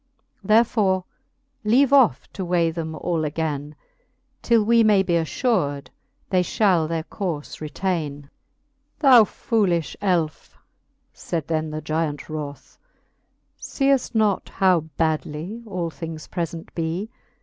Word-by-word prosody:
Therefore 210 -3 +3 0.6
leave 255 +6 +3
off 240 - +4
to 190 - -4
weigh 170 -2 +1
them 160 -1 -5
all 165 0 -1
againe, 150 -1 -3 0.7
Till 230 -2 +3
we 230 +1 +5
may 210 -3 +4
be 180 -2 -1
affur'd 160 - 0 0.4
they 185 -1 +4
fhall 180 -4 +2
their 165 -1 -2
courfe 165 -6 -5
retaine. 155 -2 -3
XXXVII. 140 - -22 0.7
Thou 260 -6 +8
foolifhe 180 - 0
elfe, 175 -6 -1 0.6
faid 165 -4 -4
then 155 -1 -1
the 155 0 -5
gyant 155 -2 -2
wroth, 150 -2 -7 0.8
Seeft 275 -3 0
not 215 -3 +1
how 185 -3 +3 0.2
badly 160 +6 -2
all 180 -5 -3
things 160 -1 -7
prefent 165 -1 -5
bee. 170 +7 -3
170 Hz, 120 wpm, -23 LUFS, 155-205 Hz, 0.8 s, Thou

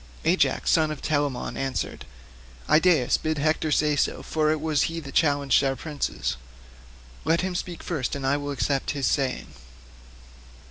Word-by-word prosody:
Ajax - - +2
son 160 -1 +3
of 155 -2 -5
Telamon 145 -4 -1
answered, 135 -2 -3 0.6
"Idaeus, 155 -5 +4
bid 155 0 -1
Hector 155 +1 +1
say 150 0 +2
so, 145 - 0
for 155 -1 0
it 155 - 0
was 155 -2 +1
he 165 0 -4
that 140 -4 -9
challenged 145 -4 +3
our 135 -1 +1
princes. 145 - -3 0.9
Let 165 +1 +2
him 185 0 -2
speak 175 -1 -5
first 150 -8 -2
and 140 -1 -4
I 135 +2 +3
will 145 0 -5
accept 140 -1 -1
his 135 - 0
saying." 135 -3 -1
150 Hz, 155 wpm, -25 LUFS, 140-160 Hz, 0.9 s, Idaeus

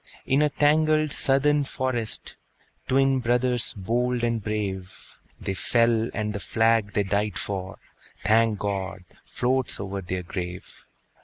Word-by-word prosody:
In 135 +2 +3
a 150 - +3
tangled 155 +1 +3
Southern 145 +2 +3
forest, 130 -5 -2 0.5
Twin 135 0 +3
brothers 125 0 +1
bold 120 +4 -1
and 115 -2 0
brave, 95 -3 -5 0.2
They 95 - -3
fell; 115 +2 +2
and 105 -1 -2
the 105 - -3
flag 110 +2 +2
they 105 - +2
died 100 +1 -1
for, 95 -3 -4 0.5
Thank 110 +1 +3
God! 95 -2 -3 0.2
floats 130 0 -1
over 100 0 -4
their 90 0 -4
grave. 90 0 -7
115 Hz, 130 wpm, -25 LUFS, 100-130 Hz, 0.5 s, In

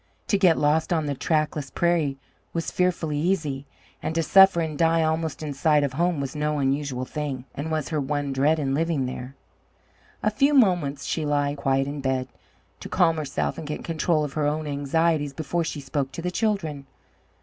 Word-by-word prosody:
To 200 - +3
get 180 -4 +5
lost 155 +4 +2
on 160 -3 +1
the 145 - -1
trackless 150 0 -1
prairie 160 -4 +1 0.4
was 165 -1 -2
fearfully 170 -5 0
easy, 150 -5 -1 0.3
and 160 - -3
to 165 - +2
suffer 190 +1 +6
and 160 -2 -2
die 165 +1 +3
almost 160 -1 -1
in 150 -2 -3
sight 150 +1 +3
of 140 -2 -1
home 170 +1 +1
was 140 +1 -4
no 150 0 0
unusual 135 -2 -1
thing, 140 -3 -4
and 145 +3 -4
was 155 -2 -2
her 155 -3 -1
one 145 0 -2
dread 145 +4 +3
in 135 -3 -1
living 160 -2 0
there. 125 +1 -6 0.9
A 215 - +2
few 275 +7 +3
moments 175 - +3
she 160 - -1
lay 145 -1 +1
quiet 135 -1 +1
in 140 +1 -5
bed, 130 -1 -1 0.5
to - - -8
calm 170 -3 +3
herself 80 - -2
and 155 - -7
get 150 - -4
control 165 -1 +1
of 145 -2 -4
her 150 -2 0
own 155 +1 -1
anxieties 145 +1 0
before 160 +4 -2
she 155 -2 -4
spoke 135 0 -3
to 165 - -6
the 180 - -1
children. 180 -10 -1
150 Hz, 195 wpm, -25 LUFS, 140-165 Hz, 0.9 s, suffer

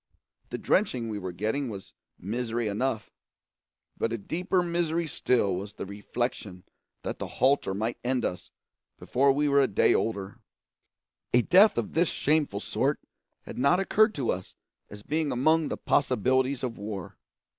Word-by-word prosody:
The - - -4
drenching 130 - +1
we 105 -1 -3
were 95 -2 -5
getting 110 +9 -2
was 100 -3 -9 0.2
misery 115 +3 -2
enough, 110 +2 -2 0.8
but 115 - -1
a 115 - -1
deeper 180 - -1
misery 170 -1 0
still 120 - +1
was 100 +3 -6
the - - -5
reflection 100 -2 -4 0.4
that - - -4
the - - -4
halter 130 -7 +2
might 110 +4 -2
end 125 0 0
us 90 - -4 0.5
before 135 +2 +2
we 145 +2 +1
were 140 0 +4
a 135 - +3
day - - +3
older. 100 0 -2 1.0
A 125 - +5
death 195 - +6
of 120 - -1
this 170 +1 +2
shameful 145 -9 0
sort - - 0 0.4
had - - -8
not 140 +8 +4
occurred 215 +2 +3
to 130 -5 0
us 90 0 -6 0.3
as 105 0 -11
being 155 +2 -1
among 155 +5 +3
the - - -3
possibilities 130 0 +1
of 120 -4 -3
war. 100 -3 -6
125 Hz, 155 wpm, -28 LUFS, 105-150 Hz, 1.0 s, death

